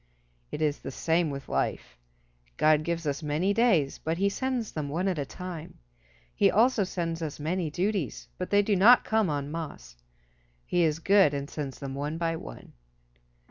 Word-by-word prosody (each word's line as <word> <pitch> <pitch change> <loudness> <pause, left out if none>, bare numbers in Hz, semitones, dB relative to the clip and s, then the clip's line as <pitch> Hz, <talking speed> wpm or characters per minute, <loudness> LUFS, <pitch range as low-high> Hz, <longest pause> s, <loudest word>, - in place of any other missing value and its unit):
It 155 - -2
is 150 -1 0
the - - -7
same 165 +4 0
with 140 -1 -6
life. - - -2 0.6
God 155 -1 +4
gives 170 +1 -3
us 145 +1 -2
many 155 +6 0
days, 200 - +2
but 160 +1 -2
he 200 +2 +2
sends 250 0 -2
them 150 -2 -4
one 175 +6 -1
at 180 -5 0
a 140 - -3
time. 175 -3 -8 0.6
He - - +4
also 230 0 +3
sends 170 -3 -3
us 155 -3 -5
many 165 +2 -1
duties, 165 - -2
but - - -3
they 205 0 +4
do 205 0 +1
not 225 +6 +7
come 220 -4 +2
en 145 -1 -3
masse. 145 - -7 0.7
He 175 - +1
is 155 -2 +2
good 190 -3 +4
and 140 0 -3
sends 140 -3 -5
them 135 -2 -6
one 145 +3 -3
by 165 -1 -1
one. - - -10
165 Hz, 180 wpm, -28 LUFS, 145-190 Hz, 0.7 s, not